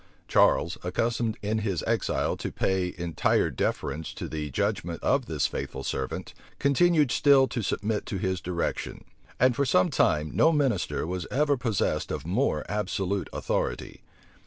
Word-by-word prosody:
Charles, 85 - +3
accustomed 115 +4 -1
in 110 +2 0
his 100 -6 -2
exile - - 0
to - - -4
pay 95 -2 0
entire 85 -2 +1
deference 80 +1 -2
to - - -5
the 75 -1 -4
judgment 85 +5 -2
of 135 -3 +2
this 75 -5 0
faithful 65 - -4
servant, 65 -1 -4 0.2
continued 150 0 +3
still 140 -2 +5
to 120 - -2
submit 105 +1 -2
to 95 - -3
his 95 -1 -1
direction; 85 -1 -3 0.4
and 125 0 +4
for 140 - +1
some 95 -8 +3
time 75 0 +2
no 160 - +5
minister 145 - 0
was 90 0 -4
ever 145 +2 +2
possessed 115 -6 -1
of - - -4
more 90 - 0
absolute 100 -2 -2
authority. - - -3
100 Hz, 150 wpm, -27 LUFS, 85-130 Hz, 0.4 s, still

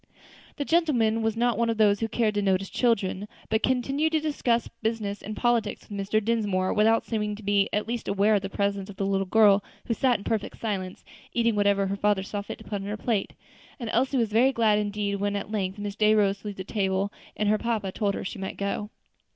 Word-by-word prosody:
The 285 - -3
gentleman 250 -10 +2
was 225 0 0
not 240 -2 +1
one 235 0 +2
of 225 - -1
those 205 -2 +4
who 225 - 0
care 225 -1 +1
to 205 0 -1
notice 195 -1 0
children, 205 -4 0 0.2
but 220 0 +1
continued 275 +5 +1
to 315 - +4
discuss 260 -6 0
business 220 -3 -2
and 215 +1 -6
politics 235 -3 0
with - - -19
Mr. 200 +2 +1
Dinsmore, 205 -5 +1
without 220 +2 +3
seeming 210 -2 -2
to 215 - -12
be 200 0 +2
in 210 - 0
the - - -19
least 235 0 -3
aware 200 +2 +3
of 205 - +3
the 195 - -4
presence 200 0 -1
of 200 - -9
the 195 - -2
little 195 -1 0
girl, 205 -1 +5 0.2
who 230 - 0
sat 250 0 +2
in 200 - -11
perfect 215 -2 -2
silence, 190 -4 -4 0.3
eating 230 -2 +2
whatever 200 -1 +2
her 195 +1 -1
father 205 -1 +1
saw 205 +1 -4
fit 200 - -7
to - - -13
put 205 - -4
upon - - -6
her 210 +1 -3
plate; 220 -2 -1 0.5
and 235 -3 -4
Elsie 265 +1 +2
was 230 -3 +1
very 250 +4 +5
glad 220 -4 +3
indeed 205 -1 -2
when 205 +1 -1
at 200 +1 -4
length 195 -2 -2
Miss 205 -1 -5
Day 215 0 +4
rose 200 -2 +2
to 210 - -9
leave 205 - -5
the 190 - -4
table, 195 0 -1 0.2
and 210 - 0
her 215 +1 +3
papa 220 -5 -1
told 200 0 -1
her - - -5
she 200 - -5
might 190 - -5
go 200 +1 -2
too. - - -14
210 Hz, 240 wpm, -26 LUFS, 200-230 Hz, 0.5 s, girl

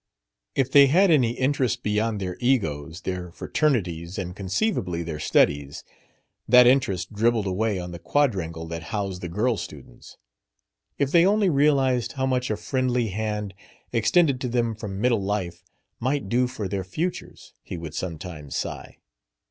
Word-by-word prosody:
If 135 -1 +1
they 140 0 +8
had 180 +6 +4
any 125 -7 +3
interest 130 -2 0
beyond 105 +1 0
their 90 -2 -4
egos, 80 - 0
their 90 -1 -4
fraternities, 90 - -1
and 90 -2 -4
(conceivably) 95 - -1
their 80 -2 -5
studies, 70 -2 +1 0.6
that 125 +1 +8
interest 105 -8 +2
dribbled 115 0 +2
away 100 +1 0
on 90 0 -6
the 85 - -8
quadrangle 90 - 0
that 85 0 -6
housed 100 -4 -3
the 85 - -5
girl 110 +6 0
students. - - -10 0.8
"If 140 -1 0
they 170 0 +6
only 200 0 +3
realized 135 -4 +2
how 130 -1 -1
much 130 -1 0
a 110 - -1
friendly 125 -2 0
hand, 105 0 -3 0.4
extended 130 +4 +3
to 125 - -2
them 115 -1 0
from 105 -3 -6
middle 120 -2 +2
life, 95 -4 -3 0.4
might 130 -1 -1
do 125 +3 +2
for 115 -5 -5
their 95 0 -3
futures...!" 165 - -5
he - - -7
would 80 -2 -7
sometimes 85 -5 -6
sigh. - - -5
110 Hz, 155 wpm, -25 LUFS, 90-130 Hz, 0.8 s, they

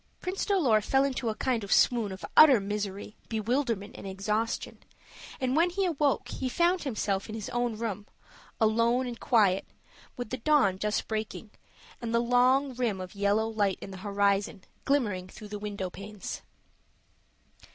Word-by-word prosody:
Prince 370 +1 -3
Dolor 285 - +3
fell 270 +6 +2
into 265 -4 -1
a 215 - -2
kind 245 -3 -1
of 200 - -7
swoon 230 -5 +3
of 190 - -7
utter 280 -7 +8
misery, 205 0 -4
bewilderment, 230 -1 -1
and - - -8
exhaustion, 210 +4 -2 0.6
and 260 -1 0
when 335 +3 +4
he 385 +2 -1
awoke 295 -5 0
he 260 - -3
found 345 +6 +2
himself 210 -7 -2
in 220 - -5
his 215 -3 -5
own 240 -2 -1
room 210 -3 -4 0.5
alone 230 +3 +3
and 240 -1 -6
quiet 205 -6 +3 0.5
with 245 -3 -5
the 255 - -2
dawn 230 -8 +3
just 210 +1 -1
breaking, 215 0 -4 0.5
and 235 -1 -2
the - - +4
long 250 +3 +3
rim 235 -6 -1
of 185 0 -7
yellow 205 +2 +1
light 205 -4 0
in 195 - -8
the 190 - -8
horizon 200 -1 0 0.2
glimmering 210 -10 0
through 210 +2 -11
the 210 0 -5
window 200 -3 -4
panes. 205 0 -7
220 Hz, 160 wpm, -29 LUFS, 200-255 Hz, 0.6 s, utter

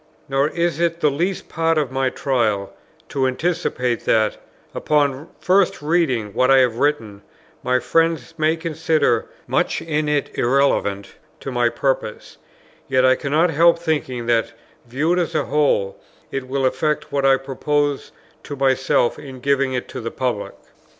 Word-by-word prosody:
Nor 135 +1 +1
is 170 0 -1
it 170 -1 0
the 150 -3 +2
least 175 +7 -2
part 165 -1 0
of 145 -4 0
my 135 0 0
trial, 110 -8 -1 0.4
to 135 -1 0
anticipate 130 -4 -1
that, 110 -1 +2 0.4
upon 145 0 0
first 190 0 +2
reading 145 - 0
what 130 - +2
I 135 - +6
have 125 -3 +3
written, 115 -9 -1 0.4
my 125 0 +1
friends 165 +7 0
may 155 0 +1
consider 160 -6 0 0.2
much - - 0
in 150 -2 -2
it 145 -1 -1
irrelevant 120 -7 0 0.2
to 135 - -5
my 120 -1 +2
purpose; 120 -3 -3 0.5
yet 130 -1 +3
I 130 - +6
cannot 150 +6 +1
help 170 +3 +4
thinking 145 -7 -2
that, 115 -1 +1 0.3
viewed 155 +9 0
as 170 -3 -2
a 150 - +1
whole, 140 -10 +1 0.3
it 135 -1 -4
will 135 0 -1
effect 150 +4 -1
what 140 -1 0
I 135 0 +5
propose 145 +2 -2 0.3
to 145 - -6
myself 130 -2 +1
in 135 -3 -10
giving 140 0 +1
it 125 - -3
to 130 - -6
the 115 - -4
public. 125 -6 -3
135 Hz, 155 wpm, -21 LUFS, 125-155 Hz, 0.5 s, I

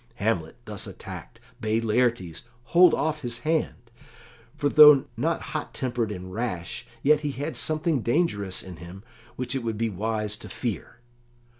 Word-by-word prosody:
Hamlet, 95 - -1
thus - - -5
attacked, - - -9 0.2
bade 110 +1 0
Laertes 110 -8 0 0.2
hold 175 +6 +6
off 155 -1 -1
his 120 -3 -3
hand, 160 0 -1 0.7
for 145 - +1
though 150 -2 +8
not 160 +8 0
hot - - -4
tempered 120 -5 -1
and 95 -2 -7
rash, 90 - -4 0.2
yet 150 +1 +5
he 150 - -2
had 145 +5 -4
something 155 -3 0
dangerous 110 - 0
in 90 -3 -9
him 90 +4 -11 0.3
which 125 0 -3
it 135 - -1
would 115 -2 -3
be 115 0 0
wise 105 +1 -2
to - - -10
fear. 120 0 -5
115 Hz, 155 wpm, -26 LUFS, 100-145 Hz, 0.7 s, though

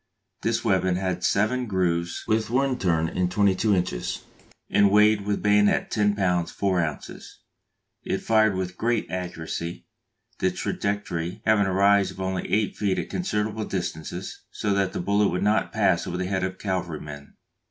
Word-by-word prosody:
This 115 +1 -1
weapon 95 -3 +2
had 90 -1 -2
seven 120 +5 +1
grooves 85 -4 -1
with 110 -1 0
one 130 +1 +1
turn 80 -3 +1
in 90 +2 -1
twenty 100 +1 +3
two 105 +2 +2
inches, 90 -9 -2 0.4
and 100 -1 +4
weighed 105 0 +4
with 105 - -1
bayonet 105 0 +3
10 105 -1 +2
lb. 90 -4 +1
4 95 -3 0
oz. 80 -2 -7 0.7
It - - -1
fired 110 -2 +3
with 90 -1 -4
great 115 -1 0
accuracy, 85 -2 -5 0.5
the - - +2
trajectory 100 -1 -3
having 105 -2 +3
a - - 0
rise 100 0 +4
of 95 - -11
only 95 -1 -2
eight 105 0 +1
feet 100 -3 0
at - - -4
considerable 110 - -2
distances, 85 -4 -5
so 100 - -1
that 100 -1 0
the - - -3
bullet 100 +2 +2
would 90 - -1
not 105 +1 +2
pass 95 -5 +1
over 90 - -3
the 95 - -2
head 95 0 -1
of 95 0 -1
a - - -25
cavalry 90 -6 -3
man. 70 -1 -10
95 Hz, 175 wpm, -25 LUFS, 90-105 Hz, 0.7 s, and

